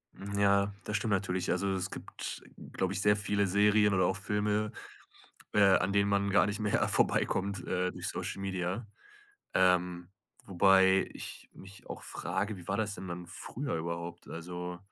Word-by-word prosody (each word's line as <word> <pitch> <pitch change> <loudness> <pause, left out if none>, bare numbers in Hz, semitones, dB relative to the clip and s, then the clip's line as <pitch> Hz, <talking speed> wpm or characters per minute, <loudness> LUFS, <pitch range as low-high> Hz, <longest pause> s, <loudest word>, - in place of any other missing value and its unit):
Hm, 100 +1 -5
ja, 100 0 +3
das 105 - -1
stimmt 105 +1 -2
natürlich. 95 -2 -1
Also, 100 +2 0
es 95 0 -2
gibt, - - -7 0.3
glaube 95 0 -1
ich, 100 - -2
sehr 105 0 +4
viele 100 -1 +2
Serien 105 +2 +4
oder 95 -1 +3
auch 95 - 0
Filme, 105 +2 0 0.8
äh, 105 - +4
an 95 -1 +4
denen 100 0 +3
man 100 0 +1
gar 100 - +5
nicht 100 +2 -3
mehr 105 -2 +1
vorbeikommt, 100 +1 +2
äh, 90 0 0
durch - - -4
Social - - -4
Media, 95 +3 -3 0.7
ähm, 90 -1 +2 0.4
wobei 95 0 +4
ich - - -8
mich 95 +1 -14
auch - - -7
frage: 105 0 -3
„Wie 90 -2 -12
war 95 - 0
das 105 -2 -1
denn 95 - -8
dann 90 0 -6
früher 120 +6 -4
überhaupt?” 85 +1 -5
Also 90 +1 -6
95 Hz, 170 wpm, -31 LUFS, 90-100 Hz, 0.8 s, gar